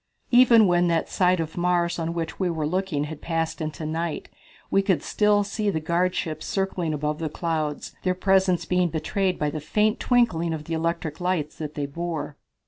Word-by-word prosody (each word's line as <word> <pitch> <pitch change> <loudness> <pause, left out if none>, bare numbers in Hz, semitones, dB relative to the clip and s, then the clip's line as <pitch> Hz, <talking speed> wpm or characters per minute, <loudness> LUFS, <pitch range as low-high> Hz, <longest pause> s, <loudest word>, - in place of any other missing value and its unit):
Even 240 -3 +7
when 175 -1 +3
that 165 -1 0
side 180 -1 +2
of 160 -1 -3
Mars 175 -1 +1
on 165 +1 -2
which 165 -1 -4
we 185 -2 +1
were 160 -3 -2
looking 180 -2 -1
had 150 0 -7
passed 165 -1 -2
into 155 0 -4
night, 160 +1 -3 0.4
we 195 - +4
could 195 -3 +1
still 210 -1 +2
see 205 +1 -2
the 160 - 0
guardships 170 -1 -1
circling 190 -4 -1
above 150 0 -2
the 160 -2 -2
clouds, 155 -2 -3
their 185 -1 0
presence 185 -2 +2
being 180 0 +1
betrayed 185 +4 -1
by 150 -1 -1
the 155 - -5
faint 210 +8 +1
twinkling 175 -10 +2
of 150 - -7
the 165 - -5
electric 165 0 -2
lights 175 -5 -1
that 150 -1 -5
they 145 - -2
bore. 160 0 -4
170 Hz, 190 wpm, -25 LUFS, 155-185 Hz, 0.4 s, Even